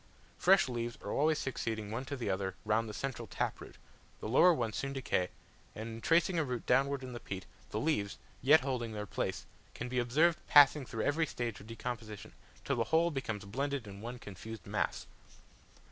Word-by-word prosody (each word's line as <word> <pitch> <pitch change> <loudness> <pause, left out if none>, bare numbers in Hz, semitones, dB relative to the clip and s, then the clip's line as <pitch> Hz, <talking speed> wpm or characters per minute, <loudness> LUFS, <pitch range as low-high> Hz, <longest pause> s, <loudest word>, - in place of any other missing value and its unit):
Fresh 190 -2 +6
leaves 120 -1 -3
are - - -4
always 155 +2 +3
succeeding 110 -6 -3
one 120 +4 -3
to 140 - -4
the 125 -5 -4
other 95 -1 -1
round 110 +1 +1
the - - -4
central 135 -2 -4
tap - - -2
root, - - -10 0.4
the - - -5
lower 135 +10 +6
ones 115 -9 -1
soon 140 0 -2
decay, 110 -9 0 0.5
and 110 +2 -5
in 115 0 -7
tracing 170 +3 +3
a - - +3
root 125 -4 -4
downwards 140 0 +2
in 130 -1 -6
the 120 - -5
peat, 95 -5 -6 0.2
the 105 - -2
leaves, 105 -8 0 0.2
yet 145 +5 +7
holding 125 -4 -2
their 105 -1 -4
place, - - -3 0.3
can 120 - -4
be 125 0 0
observed 155 +8 +3
passing 145 -2 +7
through 110 -2 -3
every 155 +2 +2
stage 120 -3 -3
of 100 - -12
decomposition, 115 -2 -6 0.3
till 140 - 0
the 115 - +1
whole 165 +7 +3
becomes 110 -8 -3
blended 135 +4 -2
in 100 -1 -9
one 120 +2 -5
confused 110 +1 -9
mass. - - -1
120 Hz, 195 wpm, -33 LUFS, 110-140 Hz, 0.5 s, yet